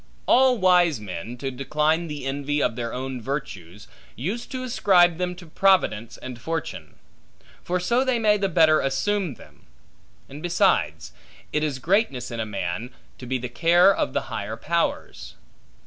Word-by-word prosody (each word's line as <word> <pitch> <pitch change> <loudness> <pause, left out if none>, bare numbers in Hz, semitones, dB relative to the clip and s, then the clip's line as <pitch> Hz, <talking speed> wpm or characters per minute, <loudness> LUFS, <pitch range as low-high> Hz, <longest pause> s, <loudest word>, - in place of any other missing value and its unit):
All 255 0 +4
wise 180 - +4
men, 105 +4 -7
to 135 +1 -4
decline 150 +5 0
the 150 -3 -6
envy 140 +2 -2
of 115 - 0
their 115 -1 -4
own 130 0 -5
virtues, 105 - -6 0.3
use 195 - -4
to 255 -1 -5
ascribe 180 -8 +3
them 180 0 -2
to 175 0 -12
Providence 160 - +1
and 125 -2 -9
Fortune; 165 +5 -5 0.7
for 180 +1 -1
so 235 +8 +1
they 260 -2 +1
may 215 -2 +3
the 195 -1 -1
better 160 -3 +4
assume 175 +4 -1
them: - - -18 0.6
and, 145 +2 -10
besides, 80 - +1 0.4
it 150 - +1
is 145 -4 -1
greatness 160 - 0
in 115 - -5
a 110 - -2
man, 100 +3 -4 0.3
to 125 - -9
be 130 +1 0
the 125 0 -5
care 175 +9 +4
of - - -1
the - - 0
higher - - -5
powers. - - -2
150 Hz, 165 wpm, -24 LUFS, 125-180 Hz, 0.7 s, All